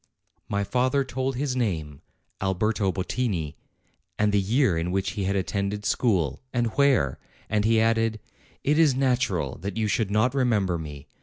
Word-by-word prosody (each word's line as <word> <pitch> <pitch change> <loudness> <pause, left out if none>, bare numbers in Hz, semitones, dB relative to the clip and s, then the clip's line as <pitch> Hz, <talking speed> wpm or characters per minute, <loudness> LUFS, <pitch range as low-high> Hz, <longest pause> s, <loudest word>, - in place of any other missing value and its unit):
My 100 0 0
father 130 +5 +1
told 130 0 -2
his 135 0 -1
name, 80 - -2 0.4
Alberto 95 +1 +1
Bottini, 95 - -2 0.6
and 105 0 +2
the 100 -1 +3
year 110 - +2
in 85 +1 -1
which 95 +1 0
he 100 -3 -3
had 100 +1 0
attended 100 +2 -2
school, 90 - +1
and 120 -2 0
where, 135 - +3 0.3
and 105 -1 +2
he 115 0 +4
added: 115 0 +2 0.4
"It 150 +3 +2
is 150 -5 +5
natural 125 - 0
that 100 +3 -5
you 110 - +1
should 105 0 0
not 110 +5 +2
remember 105 -10 +1
me. 75 -3 -8
105 Hz, 160 wpm, -26 LUFS, 95-125 Hz, 0.6 s, is